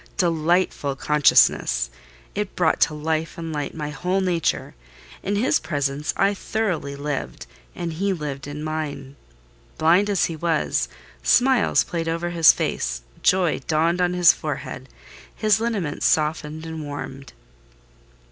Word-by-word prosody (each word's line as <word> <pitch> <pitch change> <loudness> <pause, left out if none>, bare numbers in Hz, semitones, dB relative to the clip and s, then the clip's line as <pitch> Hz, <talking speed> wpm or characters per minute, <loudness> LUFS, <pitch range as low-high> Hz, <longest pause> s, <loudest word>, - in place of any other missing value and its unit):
Delightful 165 -4 +1
consciousness! 125 - +3 0.4
It - - -3
brought - - +2
to 150 - +2
life 160 +3 -2
and 165 -1 -5
light 145 -1 -4
my 150 -2 -4
whole 180 +6 -1
nature: 175 -4 -1 0.5
in 200 +2 -2
his 230 +6 +2
presence 145 -2 -2
I 200 +1 +3
thoroughly 190 -9 -2
lived; 145 0 -4 0.3
and 170 -2 -4
he 195 +5 -1
lived 145 -6 -4
in 145 +1 -6
mine. 150 -3 -4 0.6
Blind 175 +6 +4
as 200 -3 +2
he 165 - -4
was, 165 0 0 0.3
smiles 255 -2 +4
played 165 -3 -4
over 170 +1 -2
his 165 -2 +7
face, - - -2 0.2
joy 180 -4 +2
dawned 165 +3 +2
on 180 0 +2
his 175 -2 +7
forehead: - - -6 0.5
his 215 -1 +2
lineaments 205 -11 -1
softened 155 0 0
and 160 -1 -6
warmed. 135 -2 -7
160 Hz, 135 wpm, -23 LUFS, 150-180 Hz, 0.6 s, his